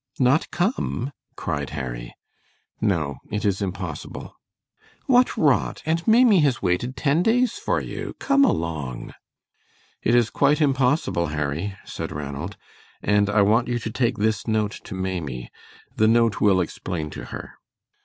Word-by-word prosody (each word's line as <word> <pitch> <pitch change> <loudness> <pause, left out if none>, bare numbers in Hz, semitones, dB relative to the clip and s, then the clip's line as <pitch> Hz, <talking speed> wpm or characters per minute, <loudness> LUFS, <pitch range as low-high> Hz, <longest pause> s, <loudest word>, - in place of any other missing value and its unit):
"Not 135 +4 +3
come?" 175 - -1 0.2
cried - - -3
Harry. - - -5 0.7
"No, 80 -10 0
it 105 +1 -2
is 100 -1 +1
impossible." 95 -5 -5 0.7
"What 250 -1 +4
rot, 145 -5 +2
and 165 +2 -1
Maimie 225 -3 +6
has 140 -7 +2
waited 100 +8 -1
ten 145 +5 +2
days 245 +5 +2
for - - 0
you. - - -6
Come 280 0 +3
along!" 80 - -1 0.9
"It 115 - +2
is 120 -2 +3
quite 145 +2 +3
impossible, 135 - +2
Harry," 75 +6 -3
said - - -5
Ranald, 75 +6 -5 0.5
"and 105 -1 +3
I 100 0 +4
want 110 +4 +3
you 120 0 0
to 115 -1 -4
take 120 0 0
this 110 +2 0
note 110 -1 0
to 95 - -6
Maimie. 85 -10 -4 0.5
The 110 - +4
note 115 -1 +3
will 95 -3 +4
explain 80 -2 -4
to - - -7
her." - - -8
105 Hz, 145 wpm, -24 LUFS, 85-135 Hz, 0.9 s, Maimie